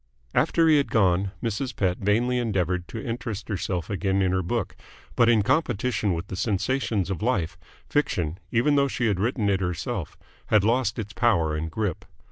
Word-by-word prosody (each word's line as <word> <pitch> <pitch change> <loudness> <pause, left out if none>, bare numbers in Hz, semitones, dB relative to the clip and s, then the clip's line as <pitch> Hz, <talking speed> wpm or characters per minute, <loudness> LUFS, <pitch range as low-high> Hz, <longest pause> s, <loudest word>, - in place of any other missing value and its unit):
After 165 -1 +3
he 155 -2 +6
had 140 - +1
gone, 95 -2 +2
Mrs. 120 +2 -2
Pett 90 -3 0
vainly 120 +5 +1
endeavoured 90 -6 -1
to 115 - -6
interest 115 -3 -4
herself 90 -4 -2
again 100 -1 0
in 95 - +2
her 95 0 +1
book, 85 - -2 0.4
but 115 -1 +4
in 110 -3 +4
competition 110 - +1
with 85 +3 -4
the 95 - -6
sensations 100 0 0
of 95 - -3
life, 100 -8 0 0.3
fiction, 90 - 0
even 120 +6 +3
though 140 -1 +4
she 125 -2 -2
had 100 -5 +1
written 110 0 0
it 100 -2 +2
herself, 90 +1 -3 0.3
had 105 -3 +4
lost 115 0 +1
its 105 -3 -5
power 95 -8 +2
and 80 +1 -3
grip. 100 +3 -2
105 Hz, 180 wpm, -25 LUFS, 90-120 Hz, 0.4 s, he